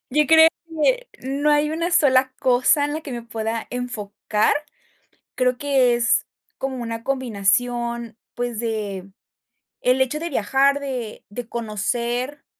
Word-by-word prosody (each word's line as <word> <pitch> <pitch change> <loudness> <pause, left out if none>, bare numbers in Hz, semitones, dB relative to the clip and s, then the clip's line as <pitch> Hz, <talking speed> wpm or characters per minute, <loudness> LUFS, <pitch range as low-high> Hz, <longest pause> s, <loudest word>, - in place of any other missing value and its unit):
Yo 300 +3 +3
creo 320 +1 +8 0.2
que - - 0
no 275 +3 0
hay 295 0 +3
una 335 +2 -1
sola 265 -5 +4
cosa 255 +4 +3
en 290 - -2
la 310 - -3
que 300 - -9
me 240 -1 -5
pueda 225 0 -4
enfocar, 215 -3 -1 0.8
creo 250 -1 +1
que 270 -4 +3
es 240 0 +2 0.3
como 265 -1 -3
una 230 -1 -5
combinación, 235 -1 -1 0.2
pues, 240 -2 -3
del 205 -4 -4 0.7
hecho 260 +3 +2
de 335 - -3
viajar, 270 +3 +2
de 255 -6 -5
de 230 +2 -6
conocer, 240 +5 -2
250 Hz, 135 wpm, -22 LUFS, 230-280 Hz, 0.8 s, creo